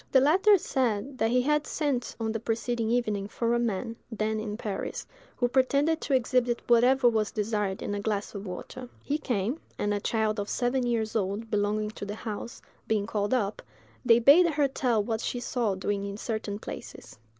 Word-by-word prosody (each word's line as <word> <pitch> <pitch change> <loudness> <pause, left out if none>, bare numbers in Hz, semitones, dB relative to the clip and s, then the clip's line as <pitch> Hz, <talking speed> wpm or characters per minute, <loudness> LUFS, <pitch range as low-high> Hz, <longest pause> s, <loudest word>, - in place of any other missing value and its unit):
The 265 - +6
latter 380 +9 +5
said 260 - -1
that 225 - +2
he 250 +1 +3
had 300 +2 +1
sent 285 -6 -1
on 220 -1 -1
the 225 - -2
preceding 230 +1 -1
evening 215 -4 0
for 230 +2 -1
a 240 - +2
man, 230 0 -2 0.2
then 220 0 -1
in 215 -1 -4
Paris, 210 -4 -4 0.3
who 245 - +2
pretended 280 +5 +2
to 280 - +1
exhibit 245 -1 +1
whatever 245 +2 +5
was 220 -3 +2
desired 210 -2 -2
in - - -3
a 205 - -2
glass 205 -1 -2
of 200 -1 -6
water. 245 +7 -7
He 295 +2 -1
came, 240 +2 -1 0.2
and 205 0 0
a 205 - 0
child 220 0 0
of 205 - -3
seven 245 0 0
years 225 -2 -1
old, 210 +2 -2
belonging 210 0 0
to 205 - -7
the 205 +1 -5
house, 220 +1 -6 0.2
being 215 -2 +1
called 205 -2 -1
up, 210 -4 -1 0.4
they 230 -2 +6
bade 285 +9 +7
her 295 -3 +2
tell 245 -5 +1
what 220 +1 -2
she 245 - -2
saw 235 -4 -1
doing 200 +1 -2
in 200 0 -6
certain 215 -2 -3
places. 205 - -9
225 Hz, 195 wpm, -28 LUFS, 210-250 Hz, 0.4 s, bade